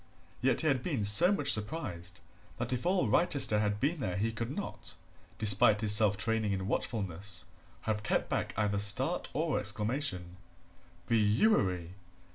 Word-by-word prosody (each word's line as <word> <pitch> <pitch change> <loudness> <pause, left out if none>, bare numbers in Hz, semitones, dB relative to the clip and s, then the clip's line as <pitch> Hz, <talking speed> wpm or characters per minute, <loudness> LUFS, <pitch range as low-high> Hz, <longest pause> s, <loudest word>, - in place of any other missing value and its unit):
Yet 130 -1 +1
he 160 - -1
had 135 -4 +1
been 135 - -3
so 105 - +6
much 145 -8 +4
surprised 100 - -2 0.4
that - - -4
if 125 +7 -3
all 185 0 +1
Wrychester 140 -11 +2
had 105 -1 -1
been 150 +7 -1
there 95 -8 -4
he 110 +3 -1
could 115 +1 -5
not, 195 +9 -7 0.4
despite 105 0 +4
his 105 -2 +3
self 105 -2 +3
training 110 -1 -1
in 95 0 -4
watchfulness, 100 -5 -4 0.4
have 110 -1 -3
kept 105 - -1
back - - -3
either 105 -2 -1
start 100 0 +1
or 105 - -1
exclamation. 105 - -3 0.7
Bewery! 105 - +1
105 Hz, 150 wpm, -30 LUFS, 100-130 Hz, 0.7 s, so